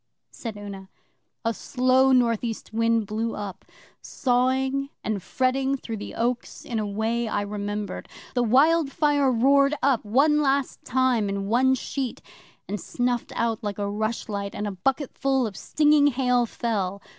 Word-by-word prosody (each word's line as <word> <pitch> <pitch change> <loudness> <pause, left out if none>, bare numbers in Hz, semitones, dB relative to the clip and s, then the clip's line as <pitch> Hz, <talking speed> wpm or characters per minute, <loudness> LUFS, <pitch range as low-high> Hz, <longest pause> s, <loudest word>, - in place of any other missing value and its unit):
said 225 -3 -7
Una. 195 -2 -8 0.6
'A 230 - +2
slow 255 +2 +2
North 240 -3 +3
East 225 -2 -5
wind 230 -1 +2
blew 220 +3 -2
up, 205 -3 -6 0.4
sawing 265 +1 0
and 215 -3 -2
fretting 265 +6 0
through 230 -3 -6
the 205 - -7
oaks 240 +1 -2
in 230 -2 -2
a 210 - -2
way 225 +3 -1
I 205 - -1
remembered. 205 0 -4 0.2
The 245 - +1
wildfire 285 +2 +3
roared 275 +4 +4
up, 270 -4 +3
one 285 +8 +3
last 275 -1 0
time 255 -5 +1
in 195 0 -2
one 260 +3 +4
sheet, 260 -1 -4 0.5
and 205 -2 -4
snuffed 245 -1 -2
out 230 -1 -1
like 205 -1 -3
a 205 -1 -2
rushlight, 205 -1 -3
and 210 - -3
a 205 - -2
bucketful 265 +5 0
of 210 -3 -5
stinging 300 -1 +3
hail 250 -3 +2
fell. 200 -5 -2
240 Hz, 150 wpm, -25 LUFS, 210-265 Hz, 0.6 s, roared